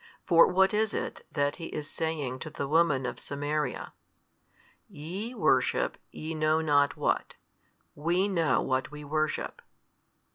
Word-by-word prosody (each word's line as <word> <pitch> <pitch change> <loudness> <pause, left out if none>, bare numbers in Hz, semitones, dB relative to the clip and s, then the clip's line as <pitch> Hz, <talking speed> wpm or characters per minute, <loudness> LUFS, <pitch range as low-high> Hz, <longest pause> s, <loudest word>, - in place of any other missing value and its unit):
For 170 -2 +7
what 190 +2 +3
is 215 0 +1
it - - -4
that 145 0 0
He 165 - -6
is 150 -1 -5
saying 155 -6 -3
to 155 - -6
the 140 - -4
woman 150 -4 +3
of 125 - -4
Samaria? 145 -1 -3 0.9
YE 190 +11 -6
worship - - +2
ye 160 +1 -6
know 155 0 +2
not 145 -3 +3
what, - - 0 0.6
WE 175 +6 +1
know 170 -6 +2
what 130 0 0
we 150 0 -9
worship. 155 +1 -2
155 Hz, 140 wpm, -29 LUFS, 145-170 Hz, 0.9 s, For